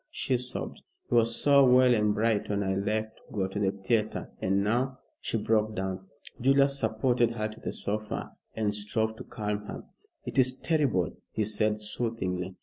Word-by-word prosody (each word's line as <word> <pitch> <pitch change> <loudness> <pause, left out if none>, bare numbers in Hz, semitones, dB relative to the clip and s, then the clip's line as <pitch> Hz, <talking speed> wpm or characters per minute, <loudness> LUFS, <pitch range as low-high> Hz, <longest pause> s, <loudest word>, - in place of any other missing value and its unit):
she 130 - -1
sobbed. 125 +1 -4 0.3
"He - - -4
was 115 -1 +4
so 140 -1 +5
well 125 -1 +6
and 105 -2 +2
bright 110 -1 +1
when 100 -1 0
I 95 -1 0
left 110 +3 -1
to - - -23
go 100 -3 0
to 95 +2 -5
the 95 -2 +2
theatre, 105 +2 -1
and 95 +1 +1
now" 125 +5 0 0.2
she - - -2
broke 110 0 +1
down. 95 0 -4 0.3
Julius 140 +2 +4
supported 120 +1 +2
her 110 -2 -2
to 110 0 -11
the - - -4
sofa 105 +1 -3 0.2
and 105 -2 0
strove 110 +2 -1
to - - -7
calm 105 -2 -4
her. - - -7 0.4
"It - - -1
is 130 0 +4
terrible," 135 - +1 0.2
he 110 - -1
said 105 0 +1
soothingly. 95 -5 -2
110 Hz, 180 wpm, -28 LUFS, 105-120 Hz, 0.4 s, well